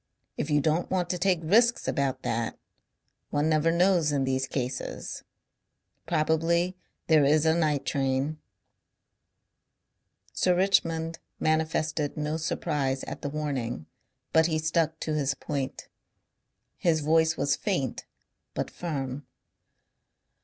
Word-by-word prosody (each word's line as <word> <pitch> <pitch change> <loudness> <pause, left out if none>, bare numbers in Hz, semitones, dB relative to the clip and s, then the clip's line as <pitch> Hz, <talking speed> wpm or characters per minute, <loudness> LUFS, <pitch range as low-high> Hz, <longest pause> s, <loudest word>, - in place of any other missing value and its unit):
If 145 - -3
you 150 -1 +3
don't 160 +4 +1
want 180 -2 0
to 180 - -2
take 180 -2 +2
risks 235 +8 +3
about 135 -2 -1
that... 115 0 -2 0.7
One 145 +1 +1
never 155 +1 +3
knows 175 -3 +3
in 140 -2 +1
these 130 0 0
cases. 125 -1 -4 0.8
Probably 170 +3 +1 0.3
there 155 -3 +5
is 150 +3 +4
a 160 - +5
night 155 -4 +1
train." 135 +2 0 1.9
Sir 180 -1 +2
Richmond 165 -3 +1 0.2
manifested 155 -1 0
no 150 +1 -1
surprise 140 -4 -1
at - - -7
the 145 - -3
warning. 135 - -3 0.5
But 160 0 +5
he 160 -2 0
stuck 160 0 0
to 155 - -2
his 140 -2 0
point. 140 -3 -4 0.9
His 160 -3 +2
voice 160 +1 +3
was 140 0 +2
faint 175 - -2 0.5
but - - -2
firm. 145 -4 -4
155 Hz, 120 wpm, -28 LUFS, 140-165 Hz, 1.9 s, there